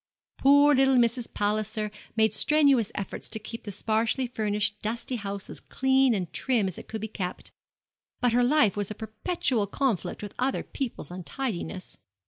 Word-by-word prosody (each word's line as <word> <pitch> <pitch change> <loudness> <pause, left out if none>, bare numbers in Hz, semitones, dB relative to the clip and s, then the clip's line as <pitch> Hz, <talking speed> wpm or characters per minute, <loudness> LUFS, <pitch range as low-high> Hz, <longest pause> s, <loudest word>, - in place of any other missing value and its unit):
Poor 285 +2 +6
little 270 0 +4
Mrs. 235 0 +2
Palliser 215 +1 -1 0.2
made 220 -2 +3
strenuous 280 -4 +3
efforts 195 - -4
to 220 - 0
keep 225 +2 -8
the 205 - -4
sparsely 225 +6 0
furnished 210 -3 -1
dusty 230 +4 -3
house 200 -2 -5
as - - -5
clean 265 -2 +2
and 180 -4 -4
trim 235 -7 +1
as 185 - -4
it - - -12
could 220 -1 -5
be 220 - -3
kept; 185 -4 -5 0.7
but 245 -2 +2
her 245 +1 +4
life 260 -5 +4
was 205 -2 -2
a 215 - -5
perpetual 220 - -1
conflict 225 - -1
with 205 - -6
other 260 +2 0
people's 255 -9 -5
untidiness. 185 0 -5
220 Hz, 165 wpm, -27 LUFS, 205-260 Hz, 0.7 s, Poor